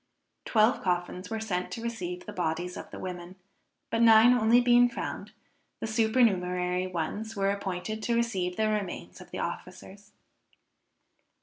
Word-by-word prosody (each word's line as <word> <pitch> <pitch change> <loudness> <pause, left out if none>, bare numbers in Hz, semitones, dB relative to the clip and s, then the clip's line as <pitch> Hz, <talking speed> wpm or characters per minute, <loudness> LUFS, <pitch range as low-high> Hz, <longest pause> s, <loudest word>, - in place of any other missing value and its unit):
Twelve 220 +2 +3
coffins 180 0 -2
were 225 -1 -3
sent 180 -5 -2
to 230 - -6
receive 180 -6 -4
the 210 - -8
bodies 175 0 -2
of - - -8
the - - -9
women, 180 0 -7 0.6
but 230 - +1
nine 225 +1 +7
only 235 0 +4
being 245 0 +5
found, - - -6 0.5
the - - -3
supernumerary 185 -6 +1
ones 195 +6 -4
were 195 0 +1
appointed 200 +2 -4
to 235 +1 0
receive 190 -7 -1
the 220 0 +2
remains 210 -4 -4
of - - -13
the - - -7
officers. 200 +1 -7
205 Hz, 145 wpm, -28 LUFS, 180-225 Hz, 0.6 s, nine